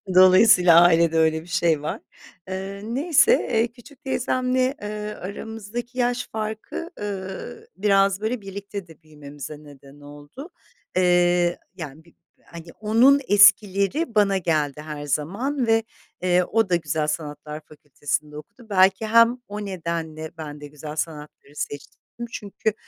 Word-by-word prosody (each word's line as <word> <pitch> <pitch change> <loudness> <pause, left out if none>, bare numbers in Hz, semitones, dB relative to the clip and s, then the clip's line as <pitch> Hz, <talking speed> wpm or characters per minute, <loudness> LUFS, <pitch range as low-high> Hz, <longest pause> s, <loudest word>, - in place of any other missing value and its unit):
Dolayısıyla 185 -2 +7
ailede 165 -1 +4
öyle 160 0 +2
bir 165 - -16
şey 170 -4 +1
var. 150 - -4 0.5
Eee, 195 +1 -6
neyse, 290 - +3 0.2
eee, 225 +1 +2
küçük 255 +4 -18
teyzemle, 255 0 0
ııı, 210 0 -5
aramızdaki 225 +5 -7
yaş 245 0 0
farkı, 220 - -5
ııı, 190 -2 -6
biraz, 195 0 +2
böyle, 225 +1 -2
birlikte 200 -1 -7
de 160 0 -18
büyümemize 150 -1 -10
neden 145 -1 -16
oldu. 145 - -12 0.5
Eee, 175 -1 +3 0.2
yani, 160 -3 -9
bir, 170 - -23 0.3
hani, 170 -1 -11
onun 240 +6 +4
eskileri 205 - +4
bana 200 -2 +3
geldi 150 -5 -1
her 150 -1 -7
zaman 230 - -2
ve, 225 0 +3 0.4
eee, 180 0 +3
o 220 +1 0
da 175 - +3
Güzel 155 -2 -1
Sanatlar 150 0 -5
Fakültesi'nde 150 0 -5
okudu. 205 +9 -13
Belki 190 +2 +3
hem 230 +2 +5
o 210 0 -6
nedenle 165 -4 -5
ben 150 -2 -8
de 145 - -8
Güzel 150 +1 -9
Sanatları 150 -2 -6
seçtim 145 -1 -6 0.3
çünkü 205 +1 -3
185 Hz, 135 wpm, -23 LUFS, 155-220 Hz, 0.5 s, Dolayısıyla